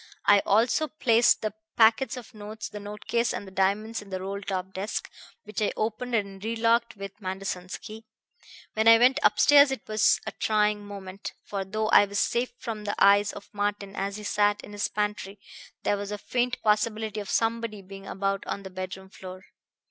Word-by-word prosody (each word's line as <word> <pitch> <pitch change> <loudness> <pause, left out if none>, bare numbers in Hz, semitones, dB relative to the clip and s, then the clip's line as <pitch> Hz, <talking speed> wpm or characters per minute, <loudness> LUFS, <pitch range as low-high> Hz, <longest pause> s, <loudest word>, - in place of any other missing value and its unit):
I 205 - +7
also 235 +9 +3
placed 235 -8 +3
the 215 - -1 0.2
packets 230 +4 +4
of 240 -2 -10
notes, 215 0 -7
the 210 - -8
note 205 +1 -9
case 235 0 +1
and - - -5
the 190 - -11
diamonds 200 +4 0
in 205 - -14
the 190 -1 -3
roll 195 +2 -5
top 190 -1 -4
desk, 200 +3 -3 0.4
which 210 +1 -5
I 210 - +2
opened 230 +3 -2
and 200 -2 -3
re 225 +1 -2
locked 230 +1 +2
with 200 +1 -9
Manderson's 185 -1 -4
key. 220 0 -11 0.7
When 220 +1 +1
I 230 0 +9
went 255 +4 +4
upstairs 285 0 +6
it 265 -5 -5
was 215 -1 +3
a - - -3
trying 210 -1 +1
moment, 195 -1 -8
for 200 -1 -4
though 215 +3 -2
I 205 - +7
was 200 0 -5
safe 240 +4 +1
from 220 -4 -6
the 205 - -2
eyes 200 +1 +5
of 200 - -10
Martin 205 -1 -2
as 195 +1 -3
he 210 - -8
sat 205 0 +1
in - - -11
his 205 0 -1
pantry, 210 -1 -3 0.4
there 205 - +1
was 200 0 -5
a 210 - -3
faint 250 +4 -1
possibility 215 0 +1
of 205 - -6
somebody 225 -2 -1
being 195 +1 -11
about 195 0 -2
on 200 - -4
the 190 - -9
bedroom 185 +1 -7
floor. 185 -1 -10
210 Hz, 195 wpm, -27 LUFS, 195-225 Hz, 0.7 s, I